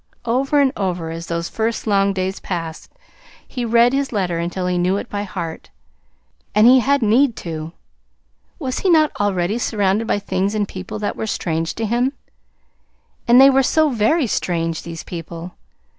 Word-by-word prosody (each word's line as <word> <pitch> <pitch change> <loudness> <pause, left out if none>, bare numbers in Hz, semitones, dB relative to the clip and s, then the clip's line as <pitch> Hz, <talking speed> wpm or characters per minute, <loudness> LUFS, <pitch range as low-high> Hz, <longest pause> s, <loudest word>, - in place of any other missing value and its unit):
Over 265 +5 +1
and 275 -1 +3
over, 180 -5 -2
as 165 +1 -7
those 170 0 -2
first 225 +1 -2
long 200 -2 +2
days 190 0 -3
passed, 165 -3 -5 0.6
he 250 - -4
read 235 +2 +4
his 275 0 0
letter 180 -6 -1
until 175 +2 -3
he 180 -1 0
knew 180 +2 +1
it - - -5
by 205 - -2
heart 175 -5 -6 0.9
and 210 +1 +6
he 255 +2 +8
had 275 +1 +2
need 235 +3 +3
to. 160 0 -5 0.8
Was 260 -6 -3
he 380 - 0
not 310 -3 +4
already 200 +1 0
surrounded 210 -1 0
by - - +1
things 200 0 -1
and 205 -1 0
people 190 +3 -7
that 210 -1 -3
were 220 - -4
strange 165 -4 -2
to 225 - -2
him? 240 +5 0 1.1
And 240 +2 +7
they 270 +1 +8
were 270 0 +4
so 310 +3 +2
very 255 +6 +2
strange 165 -6 -1
these 165 -1 -8
people! 170 0 -7
205 Hz, 175 wpm, -20 LUFS, 175-245 Hz, 1.1 s, he